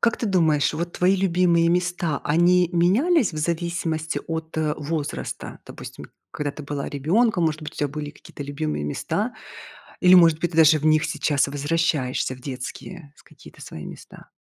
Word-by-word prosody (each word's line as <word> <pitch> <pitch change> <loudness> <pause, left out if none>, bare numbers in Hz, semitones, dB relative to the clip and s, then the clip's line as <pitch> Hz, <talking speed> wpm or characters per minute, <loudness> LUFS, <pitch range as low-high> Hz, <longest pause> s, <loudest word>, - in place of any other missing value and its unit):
как 230 - +2
ты - - -4
думаешь, 160 -7 +2
вот 170 +2 -3
твои 185 +2 +3
любимые 175 -2 +2
места, 175 -3 0
они 175 +3 +3
менялись 215 - +3
в - - -8
зависимости 165 -1 -2
от, 160 0 -5
э, 155 -1 0
возраста? 150 0 -5
Допустим, - - -10 0.3
когда 145 -1 -3
ты 150 - -9
была 140 0 -4
ребёнком, 175 - +1
может 155 0 -1
быть, 150 - -7
у - - -16
тебя 145 - -1
были 150 +1 -6
какие-то 145 - -11
любимые 145 - -3
места? 75 - -2 0.7
Или, 180 0 +7
может 165 -3 +6
быть, 175 0 -1
ты 165 - -6
даже 160 -1 +6
в 155 - -4
них 155 0 +4
сейчас 150 -2 0
возвращаешься 145 -3 -1
в 125 - -17
детские, 140 +4 -8
с - - -18
какие-то - - -17
свои 75 - -9
места? - - -12
160 Hz, 175 wpm, -23 LUFS, 150-175 Hz, 0.7 s, Или